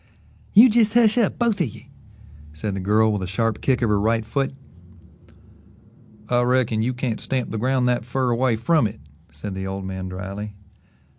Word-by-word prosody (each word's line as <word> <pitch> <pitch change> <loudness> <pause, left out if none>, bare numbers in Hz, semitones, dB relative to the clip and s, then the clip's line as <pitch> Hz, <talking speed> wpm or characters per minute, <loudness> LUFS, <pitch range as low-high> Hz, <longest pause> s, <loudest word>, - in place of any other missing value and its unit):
"You 225 +5 +10
jes' 225 -1 +2
hush 225 -3 +5
up 220 - +1
both 230 -5 +1
of 165 - +1
ye," 110 - -13 0.6
said 95 +7 -4
the - - -3
girl 105 +3 +2
with 105 - -2
a 95 - -3
sharp 110 +3 -1
kick 125 -2 +1
of 115 - +2
her 105 -1 +2
right 110 +1 +1
foot. 135 +4 -2 1.7
"I 120 +1 +2
reckon 120 -3 +1
you 125 +3 -1
can't 125 -3 -3
stamp 130 -2 -3
the 110 - -3
ground 130 +1 +1
that 125 -2 +1
fer 125 +1 -1
away 120 0 +1
from 120 +3 +2
it," 100 - -10 0.3
said 80 +7 -7
the 95 0 -5
old 95 0 -5
man 95 -1 -5
dryly. 100 +3 -6
115 Hz, 190 wpm, -22 LUFS, 105-130 Hz, 1.7 s, You